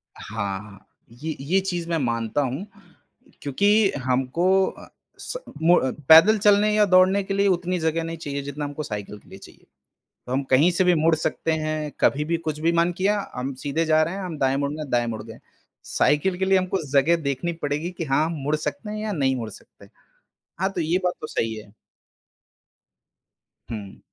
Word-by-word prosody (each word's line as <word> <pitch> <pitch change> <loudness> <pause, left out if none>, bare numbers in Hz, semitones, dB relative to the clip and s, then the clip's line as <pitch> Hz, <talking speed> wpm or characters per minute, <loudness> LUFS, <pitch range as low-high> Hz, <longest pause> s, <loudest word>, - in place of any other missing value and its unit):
हाँ, 100 -3 -4
हाँ। 100 -2 -15 0.2
ये 150 +6 -5
ये 160 +8 +1
चीज़ 175 -3 -4
मैं 165 - +1
मानता 115 -1 -1
हूँ 135 +7 -3 0.8
क्योंकि 200 +9 +3
हमको 130 +6 0 0.2
अ, - - -9 0.3
स - - -6 0.3
मु 175 +2 +5 0.3
पैदल 180 +8 +8
चलने 205 +1 +4
या 210 -1 +5
दौड़ने 185 +1 +4
के 195 - -4
लिए 200 +1 +2
उतनी 180 -1 0
जगह 160 0 0
नहीं 165 0 -5
चाहिए 140 -3 -4
जितना 145 +1 -5
हमको 145 +1 -5
साइकिल 105 -4 -6
के - - -22
लिए 95 - -11
चाहिए। - - -16 0.6
तो - - -6
हम 135 +2 0
कहीं 145 +7 +5
से 175 +2 +1
भी 180 -1 +4
मुड़ 160 +1 +3
सकते 160 +1 -2
हैं, 155 -1 -2
कभी 150 +2 +2
भी 170 +1 0
कुछ 155 -2 -4
भी 165 +2 +2
मन 170 +1 +2
किया, 205 +2 +1 0.2
हम 130 +2 -3
सीधे 155 +3 0
जा 155 0 +4
रहे 165 +4 -3
हैं, 200 - -5
हम 170 -4 -5
दाएँ 135 -1 +1
मुड़ना, 145 +2 -2
दाएँ 120 -4 0
मुड़ 110 -2 -4
गए 115 - -10
हैं। - - -17 0.4
साइकिल 180 +5 +1
के 190 - +1
लिए 190 0 +4
हमको 185 0 -1
जगह 145 +4 +4
देखनी 140 +5 -2
पड़ेगी 150 +4 -2
कि 175 -2 -5
हाँ, 140 +2 +2
हम 165 - -3
मुड़ 150 +2 +1
सकते 150 +5 -5
हैं 215 - -4
या 215 - -2
नहीं 135 -6 +1
मुड़ 115 -3 -4
सकते - - -16
हैं। - - -23 0.7
हाँ, 190 +1 +1
तो 180 - -2
ये 165 +3 +1
बात 180 -1 +1
तो 155 - -5
सही 115 -5 -2
है। 105 -1 -11 2.0
हुँ। 105 -4 -7
155 Hz, 200 wpm, -24 LUFS, 135-180 Hz, 2.0 s, पैदल